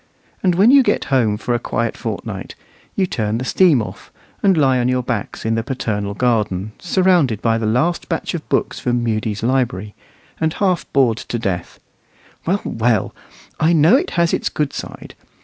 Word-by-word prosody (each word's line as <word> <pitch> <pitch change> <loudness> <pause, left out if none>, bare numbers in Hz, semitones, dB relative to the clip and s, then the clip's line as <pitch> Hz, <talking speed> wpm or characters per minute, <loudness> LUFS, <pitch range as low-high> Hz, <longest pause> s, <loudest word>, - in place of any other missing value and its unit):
And 180 -2 +2
when 205 +7 +5
you 280 0 +7
get 250 - +1
home 110 -5 +2
for 120 +3 -2
a 120 - +1
quiet 115 -1 -2
fortnight, - - -6 0.4
you 190 - +2
turn 110 - -2
the 130 - -4
steam 155 -7 +4
off, - - -10 0.3
and 195 -3 +3
lie 135 -4 +3
on 120 - +1
your 125 0 0
backs 115 -4 -4
in 110 - +1
the 115 - 0
paternal 105 -5 -3
garden, 110 -4 0
surrounded 175 - +2
by 115 0 +1
the 110 - -1
last 145 +11 0
batch 165 - -2
of 165 -3 -6
books - - 0
from 120 -1 0
Mudie's 110 -2 -2
library, 115 -5 0 0.5
and 160 0 0
half 185 -3 0
bored 125 -5 +3
to 120 - -4
death. 95 -6 -4 0.7
Well, 195 +4 +1
well! 115 -2 0 0.5
I 160 +2 +3
know 160 +7 +5
it 330 +8 +1
has 170 -1 +2
its - - 0
good 150 -2 -2
side. - - -8
125 Hz, 185 wpm, -19 LUFS, 110-165 Hz, 0.7 s, you